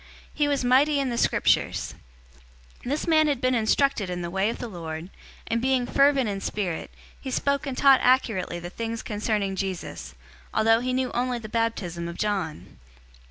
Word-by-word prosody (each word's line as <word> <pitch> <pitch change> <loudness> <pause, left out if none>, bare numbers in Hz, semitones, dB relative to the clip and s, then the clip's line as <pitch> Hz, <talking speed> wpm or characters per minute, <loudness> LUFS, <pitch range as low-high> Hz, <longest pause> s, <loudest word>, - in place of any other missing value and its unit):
He 295 -1 +1
was 280 -3 0
mighty 280 +4 +4
in 270 -2 0
the - - -2
Scriptures. - - +1 0.9
018:025 - - -26
This 285 +5 -1
man 310 -2 +4
had 285 -4 0
been 255 0 +1
instructed 230 -2 +1
in 180 -1 -4
the 170 - -4
way 195 +3 +1
of 230 - -4
the 245 - -5
Lord; 165 -3 -7 0.3
and 230 0 -1
being 260 -1 +1
fervent 275 -1 +3
in 200 -1 -3
spirit, 190 -6 -3 0.3
he 270 - -6
spoke 280 +2 0
and 260 -2 -4
taught 275 -2 +6
accurately 225 -9 +2
the 175 +1 -7
things 230 +1 -4
concerning 210 -2 -1
Jesus, 190 -2 -5 0.4
although 225 +1 +4
he 255 +1 -2
knew 255 0 -1
only 245 0 -1
the 220 -2 -8
baptism 200 -7 -2
of 170 - -7
John. 195 -7 -3
230 Hz, 180 wpm, -25 LUFS, 195-260 Hz, 0.9 s, taught